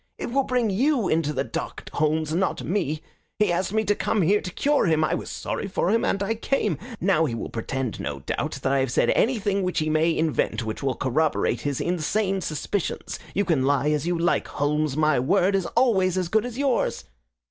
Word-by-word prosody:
"It -, -, -5 dB
will 275 Hz, +2 st, +3 dB
bring 245 Hz, -4 st, +1 dB
YOU 250 Hz, +1 st, +2 dB
into 155 Hz, -2 st, +1 dB
the 135 Hz, -2 st, -1 dB
dock, -, -, -6 dB
Holmes, 155 Hz, 0 st, 0 dB
not 190 Hz, +3 st, 0 dB
me. 160 Hz, -4 st, -1 dB, 0.3 s
He 210 Hz, -3 st, +2 dB
asked 175 Hz, +2 st, 0 dB
me 220 Hz, +1 st, +1 dB
to 205 Hz, 0 st, +2 dB
come 205 Hz, -1 st, 0 dB
here 205 Hz, +5 st, +3 dB
to -, -, -5 dB
cure 285 Hz, +5 st, +1 dB
him. 160 Hz, -1 st, +3 dB
I -, -, +1 dB
was -, -, -3 dB
sorry -, -, -4 dB
for 185 Hz, -1 st, 0 dB
him 230 Hz, -, +2 dB
and 195 Hz, -, 0 dB
I 210 Hz, +3 st, 0 dB
came. 220 Hz, -, -1 dB, 0.2 s
Now 170 Hz, -4 st, +3 dB
he 120 Hz, -6 st, -2 dB
will -, -, -5 dB
pretend, 120 Hz, 0 st, -3 dB
no 70 Hz, -2 st, -4 dB
doubt, -, -, -3 dB
that 135 Hz, -, +1 dB
I 140 Hz, -, +3 dB
have 130 Hz, -1 st, 0 dB
said -, -, +3 dB
anything 205 Hz, -5 st, +1 dB
which 180 Hz, -1 st, -2 dB
he 155 Hz, -1 st, +1 dB
may 160 Hz, +1 st, +2 dB
invent 155 Hz, -6 st, 0 dB
which 110 Hz, 0 st, -4 dB
will 135 Hz, -2 st, 0 dB
corroborate 145 Hz, +5 st, 0 dB
his 145 Hz, -2 st, -2 dB
insane 190 Hz, +3 st, 0 dB
suspicions. 170 Hz, +4 st, -3 dB, 0.2 s
You 200 Hz, -, +2 dB
can 155 Hz, -8 st, +2 dB
lie 140 Hz, +2 st, +2 dB
as 150 Hz, +1 st, -1 dB
you 175 Hz, -1 st, +1 dB
like, 170 Hz, +1 st, +1 dB
Holmes. 150 Hz, 0 st, -1 dB
My 155 Hz, -3 st, +3 dB
word 185 Hz, +9 st, +2 dB
is 190 Hz, -3 st, +1 dB
always 190 Hz, -7 st, +3 dB
as 180 Hz, -2 st, -1 dB
good 220 Hz, +5 st, +2 dB
as 245 Hz, -1 st, -8 dB
yours." 275 Hz, -3 st, 0 dB
175 Hz, 215 wpm, -25 LUFS, 150-205 Hz, 0.3 s, will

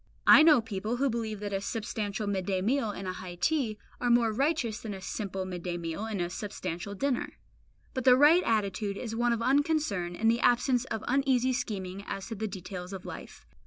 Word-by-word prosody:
I -, -, +9 dB
know 310 Hz, -5 st, +7 dB
people 215 Hz, +1 st, -3 dB
who 270 Hz, +1 st, +1 dB
believe 220 Hz, -2 st, -3 dB
that 205 Hz, -1 st, -4 dB
a 195 Hz, -, -1 dB
substantial 210 Hz, 0 st, -3 dB
midday 195 Hz, -1 st, -1 dB
meal 230 Hz, +4 st, +1 dB
and 195 Hz, -2 st, -5 dB
a 185 Hz, -, -2 dB
high 180 Hz, -1 st, -8 dB
tea 240 Hz, -, 0 dB, 0.2 s
are 245 Hz, -, 0 dB
more 235 Hz, -2 st, +4 dB
righteous 250 Hz, -4 st, 0 dB
than 215 Hz, -4 st, -5 dB
a -, -, -8 dB
simple 190 Hz, 0 st, -4 dB
midday 180 Hz, -1 st, -4 dB
meal 170 Hz, +4 st, -4 dB
and 215 Hz, -3 st, -3 dB
a 175 Hz, 0 st, -2 dB
substantial 185 Hz, -1 st, -5 dB
dinner. 275 Hz, +3 st, -2 dB, 0.6 s
But 260 Hz, -2 st, -3 dB
the 250 Hz, -1 st, +7 dB
right 305 Hz, +6 st, +7 dB
attitude 200 Hz, -2 st, 0 dB
is 225 Hz, -1 st, -5 dB
one 240 Hz, +1 st, +2 dB
of 230 Hz, -1 st, 0 dB
unconcern 270 Hz, -, +1 dB
and 225 Hz, +4 st, +3 dB
the 235 Hz, -, 0 dB
absence 245 Hz, +1 st, +3 dB
of 220 Hz, -4 st, -4 dB
uneasy 260 Hz, -1 st, +2 dB
scheming 200 Hz, -6 st, -4 dB
as 195 Hz, +3 st, -5 dB
to -, -, -4 dB
the 220 Hz, +1 st, -3 dB
details 185 Hz, -1 st, -7 dB
of 190 Hz, -1 st, -7 dB
life. -, -, -9 dB
215 Hz, 200 wpm, -29 LUFS, 190-245 Hz, 0.6 s, I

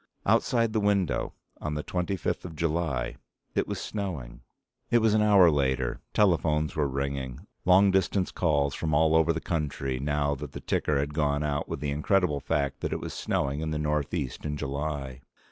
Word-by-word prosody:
Outside 115 Hz, -3 st, +2 dB
the 110 Hz, -, +2 dB
window 100 Hz, -6 st, +1 dB, 0.3 s
on 75 Hz, -1 st, -3 dB
the 75 Hz, -, -3 dB
twenty 90 Hz, +2 st, -2 dB
fifth 90 Hz, -, -2 dB
of 85 Hz, -3 st, -8 dB
July 75 Hz, -7 st, -1 dB, 0.4 s
it -, -, 0 dB
was -, -, -3 dB
snowing. 90 Hz, -, -5 dB, 0.5 s
It 120 Hz, -, +4 dB
was 110 Hz, -2 st, +3 dB
an 110 Hz, -, +4 dB
hour 100 Hz, -5 st, +6 dB
later. 65 Hz, -3 st, 0 dB
Telephones 80 Hz, -6 st, +2 dB
were 75 Hz, -2 st, +1 dB
ringing. 70 Hz, -2 st, -4 dB, 0.2 s
Long 95 Hz, +2 st, +6 dB
distance 95 Hz, 0 st, +1 dB
calls 70 Hz, -5 st, +1 dB
from 80 Hz, 0 st, -1 dB
all 80 Hz, +1 st, +4 dB
over 80 Hz, +1 st, +4 dB
the 80 Hz, -, -1 dB
country 70 Hz, -6 st, -2 dB
now 70 Hz, +1 st, 0 dB
that 70 Hz, -, -7 dB
the -, -, -5 dB
ticker 75 Hz, -, 0 dB
had 70 Hz, +1 st, -1 dB
gone 75 Hz, -1 st, +1 dB
out 75 Hz, -1 st, -2 dB
with -, -, -4 dB
the 75 Hz, -1 st, -1 dB
incredible 75 Hz, +1 st, +1 dB
fact 70 Hz, 0 st, -1 dB
that -, -, -2 dB
it -, -, -2 dB
was -, -, -6 dB
snowing 70 Hz, +1 st, -1 dB
in 80 Hz, 0 st, -2 dB
the 75 Hz, -, -2 dB
Northeast 75 Hz, -1 st, -2 dB
in 75 Hz, -1 st, -3 dB
July. 70 Hz, -2 st, -4 dB
75 Hz, 185 wpm, -28 LUFS, 70-90 Hz, 0.5 s, hour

